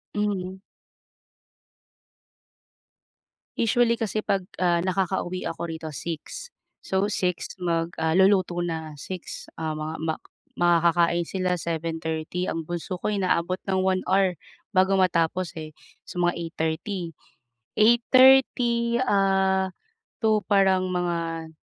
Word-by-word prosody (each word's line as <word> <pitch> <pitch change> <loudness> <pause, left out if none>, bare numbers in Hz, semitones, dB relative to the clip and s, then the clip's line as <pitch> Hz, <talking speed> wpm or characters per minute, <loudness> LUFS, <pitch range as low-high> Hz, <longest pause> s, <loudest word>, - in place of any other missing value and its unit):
Mhm. 190 -3 -2 3.0
Usually, 235 0 +2
kasi 215 -1 -2
'pag, 195 -3 -1 0.2
ah, 175 -1 +3
nakakauwi 185 -1 -1
ako 165 - -5
rito, 160 -1 -6
6:00. 160 - -7 0.3
So, 190 +2 0
6:00 180 -3 -2
mag, 170 -2 -1
ah, 160 0 +1
luluto 185 -2 +3
na. 160 -3 -4
6:00 185 -2 -7
ah, 160 -1 -2
mga 155 +1 -4
ma 160 - 0 0.4
makakakain 170 0 +3
sila 180 0 -1
7:30, 165 +1 -3
ang 165 - -2
bunso 175 +2 -4
ko - - -1
inaabot 185 -3 0
ng 190 -1 +1
1 185 0 +1
hour 190 -3 +2 0.4
bago 190 +1 +4
matapos 180 -2 +1
eh. 155 -1 -7 0.3
So 175 - -4
mga 175 0 +2
8:30, 165 +3 -3 0.8
8:30 235 0 +5
ah, 190 -4 +2 0.5
to, 215 -1 +4
parang 190 -2 +3
mga, 170 -2 -2
180 Hz, 110 wpm, -25 LUFS, 165-195 Hz, 3.0 s, 8:30